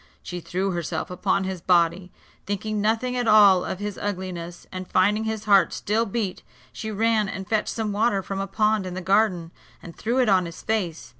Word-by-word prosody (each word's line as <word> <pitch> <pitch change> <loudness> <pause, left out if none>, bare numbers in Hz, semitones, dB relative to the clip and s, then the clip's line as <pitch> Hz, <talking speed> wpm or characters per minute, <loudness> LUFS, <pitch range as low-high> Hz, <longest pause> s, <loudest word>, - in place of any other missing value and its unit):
She 180 - -5
threw 185 +3 -2
herself 170 -1 -3
upon 190 +2 0
his 190 -2 -4
body, 180 +1 +2 0.4
thinking 205 +1 -2
nothing 230 +4 0
at 245 -2 -1
all 205 -4 +7
of - - -4
his 205 0 -5
ugliness; 180 -3 -5
and 185 -1 -7
finding 210 +4 +2
his 220 -1 -3
heart 200 -2 +4
still 220 +3 0
beat, 200 -3 -3 0.3
she 220 - -5
ran 215 -1 +1
and 190 -1 -6
fetched 220 -1 0
some 220 -2 -2
water 205 -1 +1
from 195 +1 -4
a 195 - -2
pond 210 0 +1
in 180 - -6
the 185 - -4
garden, 185 -3 +1 0.3
and 170 - -11
threw 235 +4 -2
it 255 -2 +3
on 185 -3 +3
his 165 - -10
face. 185 -7 -2
195 Hz, 200 wpm, -24 LUFS, 180-215 Hz, 0.4 s, all